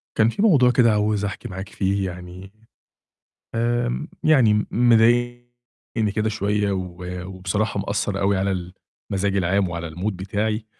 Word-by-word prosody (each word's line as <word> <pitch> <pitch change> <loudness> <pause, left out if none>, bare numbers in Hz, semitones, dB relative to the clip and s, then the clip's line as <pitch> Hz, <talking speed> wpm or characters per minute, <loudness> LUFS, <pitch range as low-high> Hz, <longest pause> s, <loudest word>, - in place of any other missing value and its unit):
كان 110 +1 +4
في 195 - -3
موضوع 140 - +5
كده 120 -2 +4
عاوز 105 -1 +1
أحكي 100 - -5
معاك 95 0 -7
فيه 95 0 -1
يعني، 90 +2 -10 1.0
آمم، 120 +5 -1 0.2
يعني 130 -9 +5
م 105 - 0
مضايقني 120 -1 +1
كده 110 0 +1
شوية 105 -1 0
و 90 -2 -4 0.3
وبصراحة 95 +3 -2
مأثّر 100 0 -2
أوي 100 0 +2
على 95 -2 -2 0.4
المزاج 100 0 0
العام 95 +1 +1
وعلى 85 -1 -5
الMood 90 +7 -3
بتاعي 105 +4 -2
105 Hz, 140 wpm, -22 LUFS, 95-115 Hz, 1.0 s, موضوع